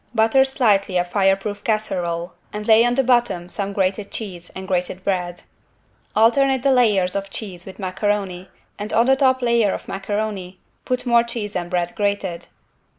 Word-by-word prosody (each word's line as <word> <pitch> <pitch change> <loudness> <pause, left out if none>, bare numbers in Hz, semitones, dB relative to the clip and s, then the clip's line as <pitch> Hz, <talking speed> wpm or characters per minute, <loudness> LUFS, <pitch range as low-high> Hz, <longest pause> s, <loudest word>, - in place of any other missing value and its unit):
Butter 225 +4 +4
slightly 210 -9 +2
a 175 - +3
fireproof 195 +2 0
casserole 175 -6 -1 0.2
and 210 0 -5
lay 220 +1 +6
on 240 0 +1
the 270 - +3
bottom 240 -8 +1
some 200 +2 -3
grated 195 +1 -1
cheese 185 -6 -7
and 190 0 -7
grated 180 0 -2
bread. 180 -3 -2 0.7
Alternate 260 +4 +3
the 275 - +4
layers 210 -8 +3
of 195 0 -3
cheese 190 -4 -7
with 190 - -10
macaroni 190 -1 -2 0.3
and 205 +1 -5
on 230 +2 +4
the 265 +1 +4
top 260 -2 +2
layer 235 -4 +3
of - - -9
macaroni 195 -2 -4 0.3
put 255 0 -1
more 235 -1 +5
cheese 230 -3 -5
and 175 -1 -3
bread 175 -1 -1
grated. 200 -4 -2
205 Hz, 165 wpm, -21 LUFS, 185-235 Hz, 0.7 s, lay